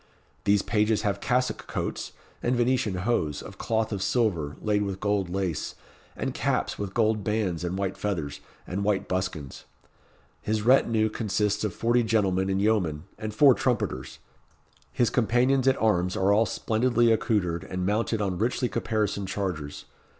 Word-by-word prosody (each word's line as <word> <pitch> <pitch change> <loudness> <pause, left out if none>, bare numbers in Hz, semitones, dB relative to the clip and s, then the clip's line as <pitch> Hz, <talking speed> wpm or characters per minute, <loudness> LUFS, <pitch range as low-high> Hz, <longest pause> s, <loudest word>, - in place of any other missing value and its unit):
These 100 -1 +3
pages 105 0 +1
have 100 -1 -1
cassock 125 +1 0
coats, - - -4 0.3
and 125 +1 +1
Venetian 120 -4 +1
hose, 80 -12 0
of - - -11
cloth 110 -1 0
of 100 -3 -3
silver, 90 - 0
laid 105 -1 +1
with 100 -2 -3
gold 100 -3 0
lace, 90 -4 -2 0.4
and - - -3
caps - - -1
with 100 -1 -4
gold 110 -2 +2
bands 95 -5 -1
and 90 +1 -2
white 95 -1 -2
feathers, 80 -8 -3 0.3
and 95 +3 -3
white 100 -1 0
buskins. 90 -7 -3 0.8
His 110 0 -1
rétinue 115 -3 +3
consists 105 -1 0
of 105 -4 -2
forty 120 +1 +2
gentlemen 100 -4 +1
and 95 0 +1
yeomen, 95 -8 +1 0.2
and 110 0 -4
four 135 +5 +6
trumpeters. - - -2 0.7
His 120 -3 +1
companions 125 +3 +2
at 135 - +3
arms 90 -5 +1
are 95 +2 +3
all 110 +2 +3
splendidly 120 +1 +2
accoutred, 95 -7 +1
and 90 -1 -4
mounted 105 +2 0
on 95 -3 -2
richly 120 +2 0
caparisoned 105 -3 -1
chargers. 90 -7 -4
105 Hz, 155 wpm, -27 LUFS, 95-115 Hz, 0.8 s, four